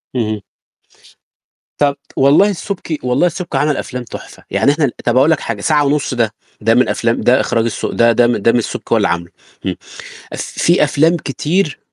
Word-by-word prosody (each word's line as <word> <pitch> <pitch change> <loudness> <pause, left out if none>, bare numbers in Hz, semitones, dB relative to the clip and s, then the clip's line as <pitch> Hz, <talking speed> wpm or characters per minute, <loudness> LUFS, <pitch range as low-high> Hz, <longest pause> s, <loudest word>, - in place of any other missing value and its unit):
اهم. 110 -3 -1 1.4
طَب 145 -1 +2 0.2
والله 145 +9 +5
السُبكي 180 -4 -4
والله 125 +7 +2
السُبكي 175 +1 -4
عَمل 150 0 +1
أفلام 125 -1 -5
تُحفة، 120 - -11
يعني 140 - +3
إحنا 150 +1 +1
ال 130 - -1
طَب 120 +1 +2
أقول 140 +5 +5
لك 160 - +2
حاجة، 110 -3 -4
ساعة 150 +5 +2
ونُص 140 -1 0
ده، 115 -3 0 0.3
ده 115 +2 +3
من 125 - +3
أفلام 115 0 0
ده 125 +2 +4
إخراج 115 -2 0
الس 115 - -3
ده 115 0 +3
ده 120 +1 +3
م 120 - +1
ده 105 +3 +3
من 120 - +2
السُبكي 115 - -3
هو - - +5
اللي - - +2
عامله 85 0 -3 0.3
إمم. - - -1 0.6
أف - - -4
في 170 -1 +1
أفلام 155 +4 +2
كتير 155 +2 -1
135 Hz, 195 wpm, -16 LUFS, 115-155 Hz, 1.4 s, والله